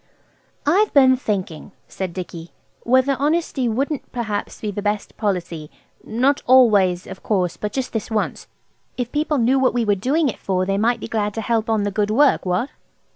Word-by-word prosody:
"I've 390 Hz, +9 st, +3 dB
been 260 Hz, -2 st, +6 dB
thinking," 195 Hz, -8 st, -4 dB
said 190 Hz, -2 st, -5 dB
Dicky, 170 Hz, -2 st, -8 dB, 0.3 s
"whether 260 Hz, +3 st, +2 dB
honesty 295 Hz, -3 st, 0 dB
wouldn't 275 Hz, +5 st, -2 dB
perhaps 215 Hz, -4 st, -4 dB
be 210 Hz, -, -3 dB
the 205 Hz, -, -4 dB
best 205 Hz, 0 st, -2 dB
policy–not 205 Hz, -, -2 dB
always, 205 Hz, -8 st, +5 dB
of -, -, -10 dB
course 185 Hz, -5 st, 0 dB
but 210 Hz, -, -4 dB
just 265 Hz, +2 st, -4 dB
this 225 Hz, -2 st, -3 dB
once. 220 Hz, -2 st, -2 dB, 0.5 s
If 245 Hz, -1 st, -3 dB
people 300 Hz, 0 st, 0 dB
knew 260 Hz, +2 st, +3 dB
what 260 Hz, -2 st, +2 dB
we 240 Hz, -2 st, +1 dB
were 205 Hz, -, +3 dB
doing 275 Hz, -, +1 dB
it 240 Hz, -, -4 dB
for 185 Hz, -1 st, -1 dB
they 195 Hz, +1 st, 0 dB
might 235 Hz, +2 st, +1 dB
be -, -, -5 dB
glad 210 Hz, -2 st, -2 dB
to 225 Hz, -, -2 dB
help 225 Hz, 0 st, -1 dB
on 220 Hz, -2 st, +1 dB
the 205 Hz, -, -1 dB
good 205 Hz, +1 st, 0 dB
work–What?" 230 Hz, -3 st, +2 dB
225 Hz, 180 wpm, -21 LUFS, 200-260 Hz, 0.5 s, been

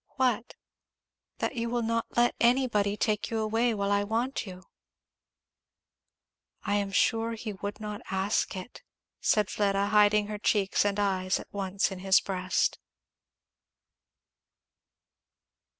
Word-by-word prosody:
"What?" 250 Hz, -3 st, 0 dB, 0.8 s
"That -, -, -2 dB
you 235 Hz, -1 st, -2 dB
will 240 Hz, 0 st, -1 dB
not 230 Hz, 0 st, -1 dB
let 240 Hz, 0 st, +4 dB
anybody 235 Hz, -5 st, +2 dB
take 210 Hz, -2 st, 0 dB
you 225 Hz, -, -2 dB
away 225 Hz, +2 st, +1 dB
while 200 Hz, -1 st, -1 dB
I 200 Hz, 0 st, +2 dB
want 230 Hz, +3 st, -2 dB
you." 185 Hz, 0 st, -9 dB, 2.0 s
"I -, -, -1 dB
am 200 Hz, -1 st, -2 dB
sure 225 Hz, +3 st, +1 dB
he 220 Hz, -1 st, -5 dB
would 205 Hz, +2 st, -6 dB
not 210 Hz, -1 st, -6 dB
ask 190 Hz, +2 st, 0 dB
it," 185 Hz, +7 st, -9 dB, 0.4 s
said 210 Hz, -2 st, +2 dB
Fleda, 200 Hz, -1 st, +1 dB
hiding 210 Hz, 0 st, +4 dB
her 210 Hz, 0 st, -5 dB
cheeks 205 Hz, -2 st, +2 dB
and 205 Hz, 0 st, 0 dB
eyes 190 Hz, -2 st, 0 dB
at -, -, -12 dB
once 195 Hz, 0 st, -1 dB
in 190 Hz, -, -6 dB
his 190 Hz, +3 st, +4 dB
breast. 185 Hz, -1 st, -1 dB
210 Hz, 130 wpm, -28 LUFS, 200-225 Hz, 2.0 s, let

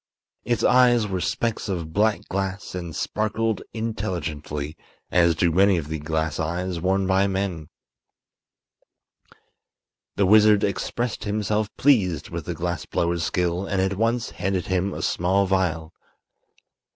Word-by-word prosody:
Its 120 Hz, -2 st, 0 dB
eyes 125 Hz, -3 st, +5 dB
were 95 Hz, -2 st, -2 dB
specks 115 Hz, +1 st, -2 dB
of 85 Hz, -4 st, -4 dB
black 105 Hz, +2 st, +1 dB
glass 95 Hz, +1 st, -3 dB
and 85 Hz, -3 st, -5 dB
sparkled 110 Hz, +3 st, -1 dB
intelligently, 80 Hz, -9 st, -4 dB, 0.4 s
as 85 Hz, -2 st, +4 dB
do 85 Hz, +2 st, +2 dB
many 95 Hz, +2 st, +4 dB
of 75 Hz, -3 st, -4 dB
the 80 Hz, 0 st, -3 dB
glass 80 Hz, 0 st, -2 dB
eyes 85 Hz, +2 st, -2 dB
worn 95 Hz, +2 st, +1 dB
by 95 Hz, +1 st, +3 dB
men. 95 Hz, -5 st, -3 dB, 2.5 s
The 100 Hz, -, +2 dB
wizard 105 Hz, +1 st, +6 dB
expressed 120 Hz, +4 st, -2 dB
himself 105 Hz, 0 st, -1 dB
pleased 100 Hz, -, +2 dB
with -, -, -5 dB
the -, -, -4 dB
glass -, -, -3 dB
blower's 85 Hz, 0 st, 0 dB
skill 90 Hz, +2 st, -1 dB
and 100 Hz, -, -1 dB
at 95 Hz, +1 st, +1 dB
once 115 Hz, +3 st, 0 dB
handed 95 Hz, -1 st, -2 dB
him 95 Hz, +1 st, 0 dB
a -, -, -5 dB
small 95 Hz, +3 st, +1 dB
vial. 90 Hz, -4 st, -1 dB
95 Hz, 135 wpm, -24 LUFS, 85-105 Hz, 2.5 s, wizard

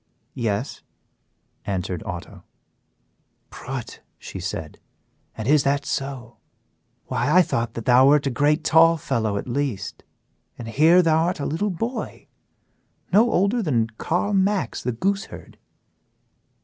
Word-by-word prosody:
"Yes," 110 Hz, -6 st, -3 dB, 0.8 s
answered 90 Hz, -3 st, -3 dB
Otto. 90 Hz, -2 st, -7 dB, 1.1 s
"Prut!" 130 Hz, -3 st, -7 dB, 0.2 s
said 90 Hz, -4 st, -6 dB
she, -, -, -38 dB, 0.6 s
"and 110 Hz, -, -4 dB
is 150 Hz, +1 st, +5 dB
that 140 Hz, +1 st, 0 dB
so! 135 Hz, -4 st, -4 dB, 0.7 s
Why, 145 Hz, -, -1 dB
I 180 Hz, +3 st, +6 dB
thought 115 Hz, -7 st, -2 dB
that 115 Hz, -, -6 dB
thou 125 Hz, +2 st, +6 dB
wert 145 Hz, 0 st, +4 dB
a 135 Hz, -, 0 dB
great 150 Hz, +4 st, +1 dB
tall 165 Hz, +1 st, +5 dB
fellow 110 Hz, -8 st, -1 dB
at 100 Hz, -, -5 dB
least, 120 Hz, -6 st, -3 dB, 0.5 s
and 120 Hz, -, -8 dB
here 160 Hz, +9 st, +5 dB
thou 160 Hz, 0 st, +3 dB
art 175 Hz, -1 st, -2 dB
a 140 Hz, -, -3 dB
little 185 Hz, +7 st, -1 dB
boy 225 Hz, +8 st, -4 dB, 0.9 s
no 225 Hz, +5 st, +5 dB
older 200 Hz, +6 st, +2 dB
than 120 Hz, -, 0 dB
Carl 180 Hz, +5 st, 0 dB
Max, 195 Hz, -, 0 dB
the 125 Hz, -, -1 dB
gooseherd." 195 Hz, -, -4 dB
140 Hz, 130 wpm, -23 LUFS, 115-170 Hz, 1.1 s, I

